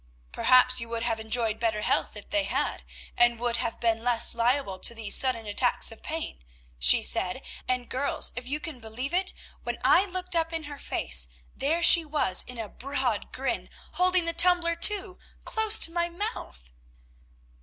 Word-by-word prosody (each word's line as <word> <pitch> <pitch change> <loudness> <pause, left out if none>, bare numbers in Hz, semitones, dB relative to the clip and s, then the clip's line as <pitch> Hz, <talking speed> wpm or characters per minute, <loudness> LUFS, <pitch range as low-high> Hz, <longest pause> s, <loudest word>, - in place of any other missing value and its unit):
"'Perhaps 255 - +4
you 230 - -8
would 230 0 -4
have 230 -2 -2
enjoyed 220 0 0
better 220 -2 -1
health - - -1
if 205 - -10
they 310 -1 +1
had, - - -2 0.3
and 240 -1 +2
would 240 -1 -1
have 230 -1 -3
been 225 -1 0
less 240 -2 +3
liable 235 -4 -1
to 235 - -3
these 220 -3 +1
sudden 250 -4 0
attacks 230 +4 0
of 225 - -12
pain,' 315 - -6 0.4
she 60 +1 +6
said; - - 0 0.2
and, 250 -1 -2
girls, 265 +3 -1
if 245 0 -7
you 290 +3 -3
can 305 -4 -7
believe 240 +7 -6
it, 370 +1 +1 0.3
when - - -5
I 380 - +4
looked 365 -1 -5
up 325 0 -1
in 325 -1 -4
her 290 -1 -9
face, - - -1 0.3
there 325 +5 -1
she 340 -1 +9
was 290 - 0
in 250 - -5
a 225 -2 -5
broad 275 +7 -3
grin, - - -4 0.2
holding 365 -1 +1
the 335 - -1
tumbler, 345 0 +3
too, 380 +1 +2 0.3
close 440 0 +3
to 330 - +3
my 345 0 -2
mouth. 340 - -7
255 Hz, 180 wpm, -26 LUFS, 230-335 Hz, 0.4 s, she